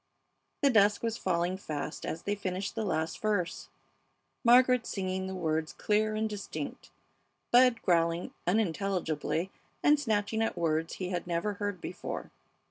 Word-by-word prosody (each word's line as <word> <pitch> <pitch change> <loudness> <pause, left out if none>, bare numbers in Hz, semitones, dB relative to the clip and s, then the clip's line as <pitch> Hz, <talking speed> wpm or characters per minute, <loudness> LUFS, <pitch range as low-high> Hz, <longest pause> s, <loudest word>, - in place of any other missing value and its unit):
The 280 - +6
dusk 205 -2 +4
was 230 -1 0
falling 180 0 0
fast 150 -4 -5
as 165 - -4
they 205 - 0
finished 195 -1 -3
the 225 - -2
last 160 -5 -1
verse, 205 -5 -1 0.7
Margaret 250 0 +5
singing 190 -1 -2
the 190 - -4
words 160 -3 -1
clear 215 0 +1
and 220 0 0
distinct, 205 -2 -6 0.6
Bud 245 -1 +5
growling 170 -1 +1
unintelligibly 180 -3 0 0.3
and 295 0 +5
snatching 220 -4 0
at 225 - 0
words 165 -1 0
he 185 -1 -4
had 175 -2 -3
never 175 +4 -1
heard 205 -2 -3
before. - - -6
195 Hz, 140 wpm, -30 LUFS, 170-215 Hz, 0.7 s, The